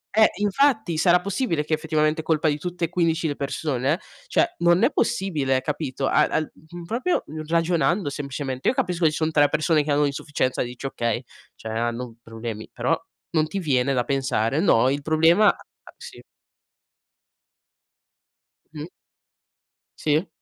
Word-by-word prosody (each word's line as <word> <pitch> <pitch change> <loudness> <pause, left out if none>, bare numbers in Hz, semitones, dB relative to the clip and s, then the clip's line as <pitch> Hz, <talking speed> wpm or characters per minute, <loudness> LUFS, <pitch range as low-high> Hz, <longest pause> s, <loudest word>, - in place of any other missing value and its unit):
eh 220 0 +6
infatti, 220 - +2
sarà 175 +2 +4
possibile 190 - -1
che 155 - -2
effettivamente 155 0 +1
è - - -18
colpa 160 -1 +1
di 150 -1 +1
tutte 180 0 -3
e - - -7
15 165 -2 0
le 145 - -2
persone? 140 +2 -1 0.3
Cioè 425 - +2
non 175 +4 +4
è 270 - +4
possibile 150 - 0
capito. 140 -1 -3
A - - +4
al 155 - -2
mhmm, 170 +2 -12
proprio 250 - -1 0.2
ragionando 170 +1 +1
semplicemente, 140 -2 -4
io - - 0
capisco 180 -5 0
che - - +6
ci 150 - -5
son 160 0 0
3 145 -2 +4
persone 155 0 +2
che 145 - -2
hanno 145 +1 +3
un'insufficienza, 140 -2 -1
dici: 125 +2 -8
"Okay, 120 -1 -2 0.3
cioè 110 - -7
hanno 120 +1 -3
problemi", 115 -1 -7
però - - +1 0.4
non 155 -1 +1
ti 195 - -5
viene 135 -5 +1
da 125 - +1
pensare, 135 0 0
no, 130 - +4
il 140 +2 -1
problema 165 +7 +4
a - - +1 0.4
sì. - - -11 2.5
Mh. 150 0 -6 1.1
Sì. 155 +4 +1
155 Hz, 155 wpm, -24 LUFS, 135-170 Hz, 2.5 s, eh